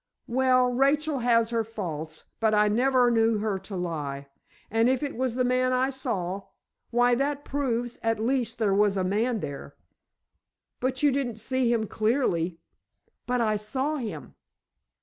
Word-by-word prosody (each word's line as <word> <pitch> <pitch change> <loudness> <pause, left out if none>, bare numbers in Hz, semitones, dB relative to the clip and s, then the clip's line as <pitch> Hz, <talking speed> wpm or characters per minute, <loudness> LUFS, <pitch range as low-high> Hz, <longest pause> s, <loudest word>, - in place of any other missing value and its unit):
"Well, 255 0 +3
Rachel 280 +3 +2
has 230 -1 +2
her 230 -1 +1
faults, 165 -8 -6
but 220 -1 +2
I 210 0 +4
never 250 +2 +3
knew 225 -1 +3
her 205 -2 -1
to 190 +1 -8
lie. 145 -6 -4 0.4
And 225 +2 +3
if 260 +2 +1
it 285 - -3
was 250 -1 -1
the 255 - +1
man 255 +1 +2
I 260 +2 +1
saw—why, 240 +1 -2
that 280 +3 -1
proves, 245 -4 -2
at 225 0 +1
least, 245 +1 0
there 215 -3 +1
was 200 0 +3
a 190 - +1
man 215 +4 0
there." 140 - -7 1.0
"But 260 +2 -2
you 290 - +5
didn't 260 -4 -1
see 250 +2 0
him 225 -2 +1
clearly." 210 -8 0 0.7
"But 250 0 +1
I 215 -2 +1
saw 265 +8 -2
him." 235 -6 -6
235 Hz, 155 wpm, -27 LUFS, 210-255 Hz, 1.0 s, you